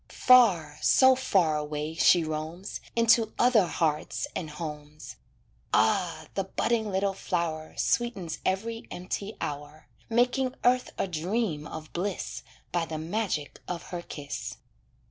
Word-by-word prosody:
Far, 180 -13 +5
so 260 0 +6
far 180 -11 +2
away 150 +1 -3
she 170 +1 +5
roams, 160 +5 -5
Into 230 -1 +4
other 235 -7 +4
hearts 150 -1 -1
and 160 - -3
homes, 150 -1 -8 0.6
Ah! 160 - +2
the 195 - -1
budding 220 +2 0
little 195 0 0
flower 160 -4 -3
Sweetens 195 -10 -1
every 225 +5 -2
empty 195 +3 -5
hour, 150 +1 -6 0.2
Making 250 +2 +2
earth 250 +1 +3
a - - 0
dream 175 -2 -2
of 155 -1 -9
bliss 185 +2 -3 0.3
By 170 -2 0
the 160 0 -4
magic 165 -2 -2
of 175 -1 -4
her 175 -1 -3
kiss. 145 -4 -6
175 Hz, 125 wpm, -28 LUFS, 155-220 Hz, 0.6 s, so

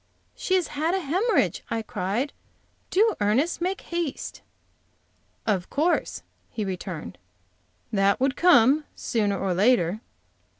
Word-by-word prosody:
"She 375 - 0
has 365 -3 +1
had 320 +5 0
a - - +1
hemorrhage!" 375 - +1
I 230 -1 -2
cried. 215 +9 -2 0.6
"Do, 430 +3 +3
Ernest, 250 +13 +1
make 375 +2 -1
haste." 340 -5 -4 1.0
"Of 190 -5 0
course," 325 +4 0 0.3
he 215 - -4
returned, 180 - -6 0.7
"that 195 0 +3
would 265 +1 +1
come, 295 -3 +5
sooner 205 -4 0
or 190 -1 -1
later." 205 -1 +2
255 Hz, 120 wpm, -25 LUFS, -, 1.0 s, come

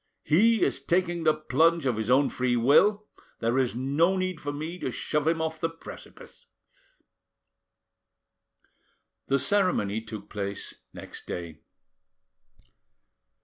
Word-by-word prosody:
He 220 +8 +4
is 135 0 0
taking 175 +2 0
the 155 - +5
plunge 160 +2 +2
of 125 -3 +1
his 110 +1 -3
own 135 +2 +4
free 125 -1 0
will, 200 - +4 0.3
there 115 +3 0
is 125 -3 0
no 145 +9 +1
need 185 -3 -2
for 145 - -3
me 155 +5 -6
to - - -2
shove 150 +4 -2
him 165 0 +2
off 160 0 -3
the 165 - 0
precipice." 165 0 -13 2.8
The 135 - +2
ceremony 140 - +1
took 110 -2 -9
place 100 -1 -4 0.2
next - - -10
day. 85 -3 -6
145 Hz, 125 wpm, -27 LUFS, 120-170 Hz, 2.8 s, the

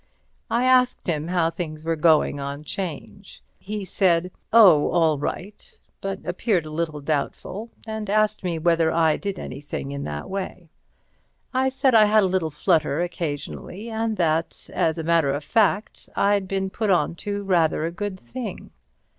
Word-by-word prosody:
I 240 +2 +1
asked 255 -1 +3
him 155 -2 -1
how 170 -2 +1
things 155 -3 -6
were 165 0 0
going 155 -2 +3
on 140 +1 -5
'Change. 185 +3 -7 0.2
He 210 0 -5
said, 180 -2 +2 0.2
"Oh, 190 -10 +7
all 160 -4 +2
right," 190 +7 -6 0.2
but 195 0 -5
appeared 180 -1 0
a 155 - -8
little 155 -2 -3
doubtful, 160 +9 -3 0.2
and 220 -2 -5
asked 215 0 +2
me 175 -3 -1
whether 165 0 +2
I 160 -2 +3
did 200 -1 -4
anything 140 +1 -6
in 140 0 -4
that 75 -1 -5
way. 185 -3 -5 0.8
I 260 +1 +2
said 265 0 +1
I 220 -2 +7
had 210 0 +4
a 185 -1 0
little 175 -4 +1
flutter 155 0 +1
occasionally, 175 +6 -5
and 220 -1 -1
that, 165 -1 -1
as 160 0 +1
a 165 - -3
matter 165 -3 +3
of 145 +2 -3
fact, 210 +2 0
I'd 200 -1 +2
been 190 0 -2
put 215 +2 -2
on 180 -2 +2
to 205 +1 -3
rather 170 -5 +2
a 165 - -2
good 190 +1 -5
thing. 235 -4 -7
175 Hz, 165 wpm, -24 LUFS, 160-205 Hz, 0.8 s, Oh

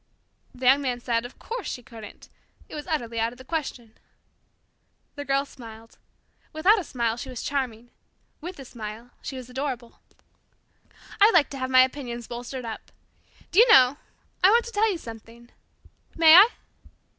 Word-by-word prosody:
The 250 +1 -7
Young 270 +3 +6
Man 250 -3 -2
said, 235 -1 -1
of 245 - -11
course, 470 -1 -6
she 245 - -6
couldn't. 225 -4 -12 0.4
It - - -14
was 300 +2 -7
utterly 235 -9 -2
out 230 +1 0
of - - -17
the 260 - -12
question. 255 -8 -5 1.1
The 285 -1 -7
Girl 275 0 +1
smiled. 225 -4 -13 0.5
Without 375 +8 +4
a - - -4
smile, 235 -6 -2
she 265 +2 -7
was 250 -3 -6
charming. 245 -4 -3 0.5
With 360 +4 -7
a 270 - -10
smile, 230 0 -9
she 270 - -6
was 255 -2 -8
adorable. 255 -2 -5 1.2
"I 415 - +8
like 340 -9 +3
to 275 - -6
have 260 0 -3
my 255 0 +7
opinions 245 -3 -5
bolstered 245 +1 -7
up. 225 -1 -8 0.6
Do 365 - +3
you 470 0 +7
know, 260 - +6 0.5
I 375 - +8
want 465 +2 +4
to 470 - -7
tell 435 0 +2
you 365 - -3
something? 230 -2 -12 0.7
May 320 -1 +7
I?" 390 +6 +9
255 Hz, 170 wpm, -25 LUFS, 235-310 Hz, 1.2 s, I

